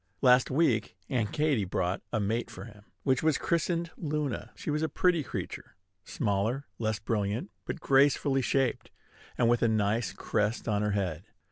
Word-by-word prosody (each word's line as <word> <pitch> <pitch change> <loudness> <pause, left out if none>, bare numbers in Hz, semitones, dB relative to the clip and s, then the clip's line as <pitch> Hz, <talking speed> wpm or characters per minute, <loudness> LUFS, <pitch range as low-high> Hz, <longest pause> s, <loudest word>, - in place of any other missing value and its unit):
Last 125 0 +6
week, 130 - +1
Aunt 115 -5 0
Katy 150 -8 +1
brought 90 0 -1
a 110 - 0
mate 110 +4 -1
for - - -9
him, 105 -3 -14 0.2
which 130 -1 +2
was 155 -3 +3
christened 170 0 0
Luna. 150 -4 -2
She - - -4
was 150 +1 0
a 160 - 0
pretty 175 +2 +2
creature, - - -6 0.3
smaller, 110 +6 -1
less 110 -2 0
brilliant, 105 - -2
but - - -4
gracefully 135 -1 +3
shaped, 135 0 0 0.5
and 120 - +3
with 120 0 +3
a 115 - +4
nice 110 0 +1
crest 105 +3 -1
on 105 -2 +1
her 105 -1 0
head. 90 -3 -2
120 Hz, 165 wpm, -29 LUFS, 105-145 Hz, 0.5 s, Last